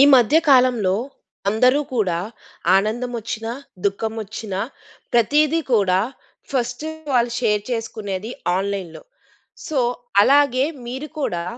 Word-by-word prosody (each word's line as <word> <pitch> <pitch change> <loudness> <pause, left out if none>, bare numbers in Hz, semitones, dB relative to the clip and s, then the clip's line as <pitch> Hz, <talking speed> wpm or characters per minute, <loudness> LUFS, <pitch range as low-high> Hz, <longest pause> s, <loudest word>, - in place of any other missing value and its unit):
ఈ - - +9
మధ్య 255 +4 +5
కాలంలో 250 -8 +4 0.5
అందరూ 250 +7 +4
కూడా 185 -7 +1 0.6
ఆనందం 225 +5 -1
ఒచ్చినా, 225 +1 -4 0.3
దుఖం 220 +3 -2
ఒచ్చినా 205 -2 -5 0.5
ప్రతీదీ 295 +7 +3
కూడా 190 -4 +3 0.5
ఫస్టు 250 +2 -2 0.3
వాళ్ళు 240 -1 +2
షేర్ 210 -4 +1
చేసుకునేది 220 -3 -4 0.3
ఆన్‌లైన్‌లో. 195 -3 -3 0.6
సో, 305 - -1 0.4
అలాగే 275 +1 +4 0.2
మీరు 265 +5 -5
కూడా 175 -11 -1
230 Hz, 105 wpm, -21 LUFS, 200-255 Hz, 0.6 s, ఈ